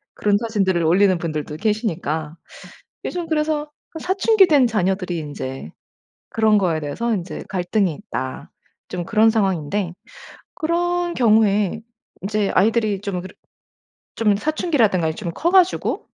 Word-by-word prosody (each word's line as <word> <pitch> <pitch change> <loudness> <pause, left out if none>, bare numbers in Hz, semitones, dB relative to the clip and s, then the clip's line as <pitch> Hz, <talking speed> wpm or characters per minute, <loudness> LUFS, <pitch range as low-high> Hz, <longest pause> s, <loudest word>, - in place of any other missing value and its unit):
그런 205 -1 +1
사진들을 195 -6 0
올리는 185 +3 +4
분들도 155 -3 -4
계시니까 170 -8 -2 0.8
즘 350 -2 -4
그래서 300 -1 -1 0.2
그 320 - -7
'사춘기 385 +3 +4
된 280 -6 +4
자녀들이 190 -4 -1
인제 135 - -6 0.6
그런 220 -1 +3
거에 170 -5 +1
대해서 190 +11 -2
인제 180 -3 -4
갈등이 185 -1 0
있다.' 130 - -6 0.4
좀 180 -1 -4
그런 220 +3 +4
상황인데 190 -3 0 0.6
그런 350 +1 -1
경우에 215 -3 +3 0.4
인제 210 0 0
아이들이 215 -1 +2
좀 195 -3 -3
그러 185 - -10 0.8
좀 210 -3 +2
사춘기라든가 230 - +1
이 160 - -2
좀 175 -1 -5
커 340 - 0
가지고 370 -1 +2
205 Hz, 295 characters per minute, -21 LUFS, 175-235 Hz, 0.8 s, 올리는